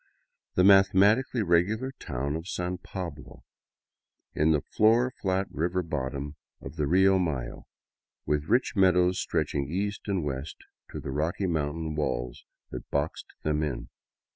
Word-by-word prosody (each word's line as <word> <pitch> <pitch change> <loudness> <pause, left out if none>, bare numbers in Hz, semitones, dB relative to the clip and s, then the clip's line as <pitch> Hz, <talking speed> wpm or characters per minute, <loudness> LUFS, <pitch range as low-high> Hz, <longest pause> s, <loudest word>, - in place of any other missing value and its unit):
the 90 - +4
mathematically 100 +5 +5
regular 100 +9 +1
town 70 +1 -3
of 80 +2 -6
San 90 -1 -3
Pablo, 90 -6 -8 0.9
in 80 +1 +2
the 75 -2 +2
floor 120 +4 +4
flat 95 0 +1
river 90 +4 -1
bottom 70 -1 -4 0.2
of 70 +3 -9
the 75 -3 -1
Rio 95 +3 +4
Mayo, 70 -9 -3 0.6
with 75 0 0
rich 125 +2 +2
meadows 90 -1 +4
stretching 70 -1 -1
east 100 +5 -3
and 95 -4 0
west 70 +1 -4 0.3
to - - -5
the 70 - -6
rocky 80 +7 -1
mountain 80 -1 -2
walls 60 -5 -3 0.3
that - - -7
boxed 70 +2 -2 0.2
them 75 0 0
in. 75 -5 -3
85 Hz, 140 wpm, -28 LUFS, 75-95 Hz, 0.9 s, mathematically